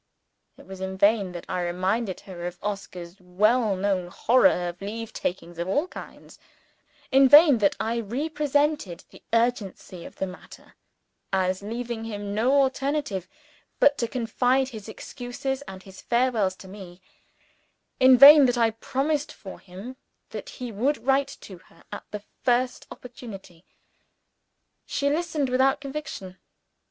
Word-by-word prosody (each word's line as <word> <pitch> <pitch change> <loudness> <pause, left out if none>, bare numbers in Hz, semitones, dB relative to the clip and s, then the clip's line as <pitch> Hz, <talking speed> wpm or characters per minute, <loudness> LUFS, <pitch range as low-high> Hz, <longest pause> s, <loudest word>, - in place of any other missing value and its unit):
It - - -15
was 190 -1 -10
in 190 0 -4
vain 200 -1 +3
that 175 - -8
I 185 -1 -2
reminded 185 +4 -2
her 175 -2 -7
of 175 0 -7
Oscar's 190 -3 -6
well 210 +4 +2
known 190 -2 -1
horror 225 -1 +3
of 175 +2 -11
leave 220 +3 -6
takings 175 -1 -5
of 170 - -2
all 290 - 0
kinds; - - -12 0.7
in 270 0 +6
vain 295 -3 +8
that 200 -2 +2
I 230 +1 -1
represented 290 - -1
the - - -16
urgency 230 -6 -1
of - - -11
the - - -2
matter 180 -1 -13 0.6
as 185 -1 0
leaving 230 +2 -5
him 205 -2 -5
no 250 +7 +3
alternative 270 - -2 0.5
but 285 0 +5
to 235 - 0
confide 250 +2 0
his 220 -3 -9
excuses 260 +4 -5
and 190 0 -9
his 190 -1 -13
farewells 235 -6 +1
to 190 - -13
me; 185 -2 -11 1.0
in 260 -1 +7
vain 285 +1 +10
that 245 0 0
I 230 -1 +3
promised 275 +6 -2
for 190 -2 -11
him 195 +8 -10 0.3
that - - -7
he 250 -2 -6
would 250 +7 -1
write 275 +1 +1
to 185 -3 -11
her 165 - -23
at - - -7
the 210 -1 -7 0.2
first 250 0 0
opportunity. 200 -8 -11 1.2
She 280 0 0
listened, 315 -3 -1
without 265 +2 +2
conviction. 270 -10 -7
225 Hz, 145 wpm, -25 LUFS, 190-260 Hz, 1.2 s, vain